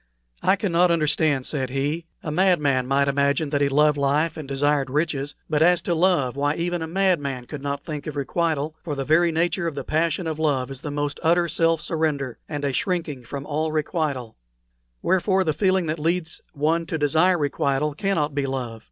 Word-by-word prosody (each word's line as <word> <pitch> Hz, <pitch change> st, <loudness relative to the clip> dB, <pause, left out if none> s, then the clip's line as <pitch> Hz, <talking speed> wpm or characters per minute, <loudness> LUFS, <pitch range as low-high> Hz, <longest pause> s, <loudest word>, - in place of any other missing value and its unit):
"I -, -, +4 dB
cannot 180 Hz, -3 st, +2 dB
understand," 155 Hz, -4 st, +1 dB
said 135 Hz, -4 st, -2 dB
he. 145 Hz, +5 st, -2 dB, 0.2 s
"A 150 Hz, -, -3 dB
madman 150 Hz, -7 st, +2 dB
might 140 Hz, +1 st, +2 dB
imagine 140 Hz, +2 st, +1 dB
that 145 Hz, -1 st, +1 dB
he 140 Hz, -, +3 dB
loved 150 Hz, +1 st, +3 dB
life 145 Hz, +4 st, +1 dB
and 155 Hz, -3 st, -7 dB
desired 140 Hz, 0 st, +1 dB
riches; 145 Hz, -1 st, -1 dB
but 155 Hz, -1 st, 0 dB
as 175 Hz, +1 st, +5 dB
to 175 Hz, -, 0 dB
love, 165 Hz, -7 st, +2 dB
why 145 Hz, +2 st, 0 dB
even 175 Hz, 0 st, -2 dB
a 160 Hz, -, -3 dB
madman 160 Hz, -8 st, 0 dB
could 145 Hz, +2 st, -7 dB
not 140 Hz, 0 st, -4 dB
think 150 Hz, -3 st, -5 dB
of 150 Hz, -, -5 dB
requital, 155 Hz, +1 st, -1 dB
for 150 Hz, -4 st, -3 dB
the 135 Hz, -1 st, -3 dB
very 165 Hz, +3 st, +4 dB
nature 170 Hz, +2 st, 0 dB
of 160 Hz, -, -4 dB
the -, -, -4 dB
passion 160 Hz, +2 st, 0 dB
of 160 Hz, -1 st, -3 dB
love 140 Hz, -4 st, 0 dB
is 135 Hz, -1 st, -8 dB
the 150 Hz, -, -5 dB
most 145 Hz, 0 st, -3 dB
utter 170 Hz, +1 st, +3 dB
self 165 Hz, 0 st, +1 dB
surrender, 150 Hz, -6 st, -2 dB
and 145 Hz, -2 st, -3 dB
a 140 Hz, -, -1 dB
shrinking 160 Hz, -7 st, -2 dB
from 140 Hz, +3 st, -6 dB
all 155 Hz, +1 st, -1 dB
requital; 150 Hz, -6 st, -2 dB, 0.7 s
wherefore, 190 Hz, +1 st, +2 dB
the 155 Hz, -4 st, 0 dB
feeling 185 Hz, +2 st, +2 dB
that 155 Hz, 0 st, -2 dB
leads 165 Hz, +1 st, -1 dB
one 160 Hz, +3 st, 0 dB
to 160 Hz, -, -2 dB
desire 160 Hz, +5 st, +3 dB
requital 145 Hz, -1 st, 0 dB
cannot 155 Hz, -5 st, 0 dB
be 140 Hz, -1 st, -1 dB
love. 125 Hz, -4 st, -4 dB
150 Hz, 195 wpm, -24 LUFS, 140-165 Hz, 0.7 s, as